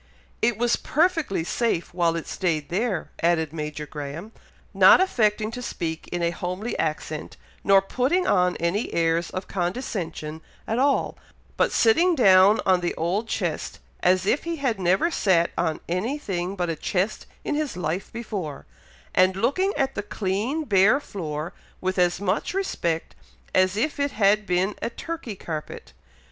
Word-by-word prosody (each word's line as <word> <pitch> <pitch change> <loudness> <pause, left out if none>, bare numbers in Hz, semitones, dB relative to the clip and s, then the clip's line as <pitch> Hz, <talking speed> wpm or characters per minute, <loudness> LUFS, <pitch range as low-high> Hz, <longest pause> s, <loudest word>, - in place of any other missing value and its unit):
"It 230 -1 +2
was 240 0 +2
perfectly 320 - +1
safe 175 -2 -1
while 170 -2 +1
it 165 - -4
stayed 160 -6 -2
there," 195 -1 -1
added 160 -2 +1
Major 150 -1 -4
Graham, 150 +7 -7 0.4
not - - +8
affecting 215 - +1
to 250 +2 -6
speak 165 -8 -4
in 175 -1 -3
a 170 - +2
homely 180 +6 -4
accent, 155 0 -3 0.3
nor 195 -1 +5
putting 265 - +1
on 180 -2 +2
any 170 +6 -1
airs 165 0 +1
of 185 - -5
condescension 175 -5 -3 0.3
at 225 +2 0
all, 280 +1 +1 0.4
but - - +2
sitting 335 +11 +4
down 195 -4 +6
on 185 -1 +4
the 175 -1 -2
old 185 +7 -1
chest 175 -8 -3 0.2
as 185 +1 +3
if 250 +8 +1
he 335 0 -2
had 265 -9 -1
never 190 - +2
sat 175 - +2
on 160 -2 -1
any 200 - -1
thing 190 -8 -3
but 175 -2 -1
a - - -3
chest 190 +6 -2 0.2
in - - -2
his 295 -8 -2
life 175 +2 -3
before, 200 - -5 0.5
and 185 0 +4
looking 285 - +1
at 270 -2 +1
the - - -3
clean 210 +9 -2
bare 205 +1 +4
floor 160 - -5 0.3
with 185 0 -1
as 175 0 +2
much 200 - -1
respect 170 - -2 0.4
as 185 +1 +3
if 290 +6 -1
it 280 0 0
had 210 0 +3
been 180 +3 +1
a - - -1
Turkey 250 -3 -6
carpet. 155 -4 -7
190 Hz, 160 wpm, -24 LUFS, 170-235 Hz, 0.5 s, not